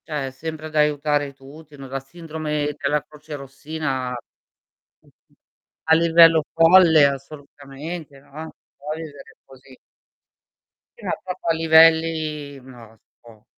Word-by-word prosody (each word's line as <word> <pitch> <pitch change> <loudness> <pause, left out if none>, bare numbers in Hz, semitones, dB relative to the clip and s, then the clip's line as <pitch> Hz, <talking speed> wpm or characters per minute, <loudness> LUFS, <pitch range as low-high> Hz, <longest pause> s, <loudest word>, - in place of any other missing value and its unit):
Cioè, 150 -4 -3
è - - -7
sempre 155 +3 -7
ad 155 - -12
aiutare 150 -1 +1
tutti, 145 +3 -15
no, 135 -1 -10
la 135 +1 -4
sindrome 150 0 -5
della 145 +1 -1
crocerossina 145 -2 -6
mhmm, 125 -2 -11 0.8
mhmm, - - -33 0.5
a 160 0 +4
livello 165 -1 +5
folle 165 -2 +6
assolutamente, 140 +2 -7
no. 155 +4 -10 0.3
Può 150 +2 -6
vivere 155 -3 -11
cosi. 130 0 -18 1.2
Sì, - - -13
no, - - -1
proprio 185 -1 -7
a 165 - +3
livelli 160 -3 +3
no, 130 -1 -15
non 110 +1 -22
si - - -79
può, 110 -3 -18
150 Hz, 135 wpm, -22 LUFS, 140-160 Hz, 1.2 s, folle